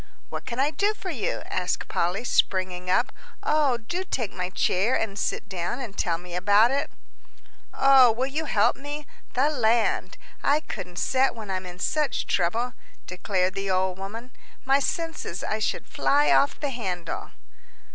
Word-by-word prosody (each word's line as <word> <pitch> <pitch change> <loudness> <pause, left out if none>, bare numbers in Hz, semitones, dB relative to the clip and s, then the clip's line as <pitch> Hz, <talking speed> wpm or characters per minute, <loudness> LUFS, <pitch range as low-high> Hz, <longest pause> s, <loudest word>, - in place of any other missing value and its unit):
"What - - -6
can 240 +1 -4
I 285 +3 +3
do 405 +8 +1
for 385 -3 -5
you?" 250 -10 -2
asked 180 0 -2
Polly, 180 +6 0
springing 185 -5 0
up. 185 - +2 0.3
"Oh, 295 -5 +2
do 345 +12 -4
take 240 - -3
my 180 0 -3
chair 195 +5 +2
and 220 -3 -2
sit - - -2
down 185 +5 -3
and 230 -7 -6
tell 170 -5 0
me 175 +1 -10
about 205 +6 +4
it." 280 +1 0 0.8
"Oh, 270 -3 +6
will 245 +4 -1
you 295 +4 -2
help - - +3
me? 290 +2 -6 0.3
The 280 +4 +3
land! 235 -4 +1 0.2
I 290 +2 +3
couldn't 180 - -7
set 265 +4 +2
when 215 -4 -6
I'm 185 -1 -3
in 180 0 -9
such 300 +9 0
trouble," 225 +8 0 0.3
declared 185 0 -1
the 195 0 -3
old 185 0 +1
woman. 225 +6 -7 0.3
"My 270 +1 +4
senses, 320 - -3
I 215 - -1
should 215 - -1
fly 290 +1 +2
off 280 - +3
the 285 -2 -2
handle!" 185 -9 -4
225 Hz, 165 wpm, -26 LUFS, 185-275 Hz, 0.8 s, Oh